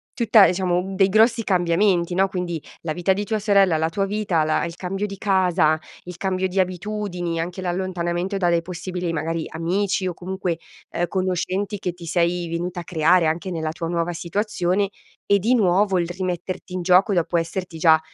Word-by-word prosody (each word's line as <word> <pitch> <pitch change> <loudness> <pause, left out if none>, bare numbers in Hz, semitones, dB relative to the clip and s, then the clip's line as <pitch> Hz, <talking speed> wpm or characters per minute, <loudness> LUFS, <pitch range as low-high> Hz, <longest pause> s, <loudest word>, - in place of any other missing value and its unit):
tutta 230 -6 +6
diciamo 180 +1 0
dei 195 0 +4
grossi 225 +3 +4
cambiamenti 175 -1 +2
no, 195 +1 +3
quindi 175 -4 -4 0.2
la 160 -2 -2
vita 175 +3 0
di 200 +2 0
tua 215 +2 -1
sorella, 200 -4 +4
la 160 +1 0
tua 195 +4 -1
vita, 195 -5 0
la 155 - +1
il 170 0 -4
cambio 195 +3 -3
di 195 -1 -8
casa, 180 -6 +2 0.3
il 180 0 -8
cambio 190 0 -1
di 185 +1 -7
abitudini, 180 -2 -2
anche 175 +3 -5
l'allontanamento 180 +1 -2
dalle 175 -3 +2
possibili 180 0 -4
magari 165 +1 -2
amici 185 +4 -1
o 180 - -2
comunque, 180 -1 -3 0.3
ehm, 175 - -1
conoscenti 190 +2 -2
che 180 - -2
ti 170 -1 -11
sei 170 +1 0
venuta 175 +2 -3
a - - -9
creare 165 +1 +3
anche 165 +4 -1
nella 160 -2 -2
tua 165 +1 -5
nuova 170 0 -1
situazione 190 +2 -1 0.4
e 200 0 +3
di 225 +6 +2
nuovo 195 -2 +3
il 170 - -1
rimetterti 180 +1 -4
in 185 - -2
gioco 185 +3 +4
dopo 175 -1 0
esserti 170 +1 -3
già 160 -1 +6
180 Hz, 180 wpm, -22 LUFS, 170-195 Hz, 0.4 s, tutta